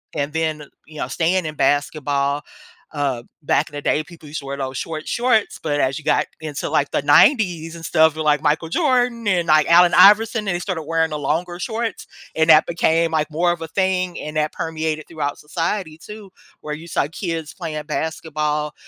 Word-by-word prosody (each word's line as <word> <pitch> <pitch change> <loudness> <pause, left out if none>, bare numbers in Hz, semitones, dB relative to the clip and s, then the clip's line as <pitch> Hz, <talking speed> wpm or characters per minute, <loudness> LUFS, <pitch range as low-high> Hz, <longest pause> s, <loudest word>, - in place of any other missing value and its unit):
and 145 +1 -2
then, 160 -2 -1
uh, - - -12 0.2
you 155 - -13
know, - - -2
staying 175 +4 0
in 155 - -4
basketball, 145 -1 0 0.5
uh, 140 -5 -1 0.2
back - - +1
in 145 - -12
the 145 - -4
day, 150 - +1
people 165 -2 -14
used 155 - -4
to 140 - -11
wear 140 0 -4
those 130 -1 -4
short 155 -1 -5
shorts, 240 -3 +1
but 145 -2 -1
as 130 +3 0
you 150 - -16
got - - +2 0.2
into, 155 -2 -4
like, 140 - +1
the - - 0
'90s 165 - +3
and 165 -1 -8
stuff, 160 -1 +3
with, 155 - -3
like, 150 -1 +3
Michael 160 +1 0
Jordan 245 - +1
and, 180 -4 +1
like, 155 -1 +5
Allen 175 +1 +6
Iverson, 210 +3 +5
and 180 - 0
they - - -2
started 180 -4 -4
wearing 160 +1 0
the 150 - -3
longer 175 +5 -2
shorts, 225 +4 -4 0.3
and 160 +1 +2
that 155 0 +7
became, 165 -1 +1
like, 155 -1 0
more 175 +3 +1
of 175 -1 -4
a 165 - -5
thing, 185 +1 -1
and 150 0 -5
that 155 0 0
permeated 160 -1 -3
throughout 145 -3 -3
society 165 +1 -3
too, 210 +3 -11 0.3
where 150 - -5
you 165 +2 -11
saw 145 - 0
kids 165 -5 -4
playing 155 -4 -5
basketball, 150 -1 -2
160 Hz, 205 wpm, -20 LUFS, 150-175 Hz, 0.5 s, that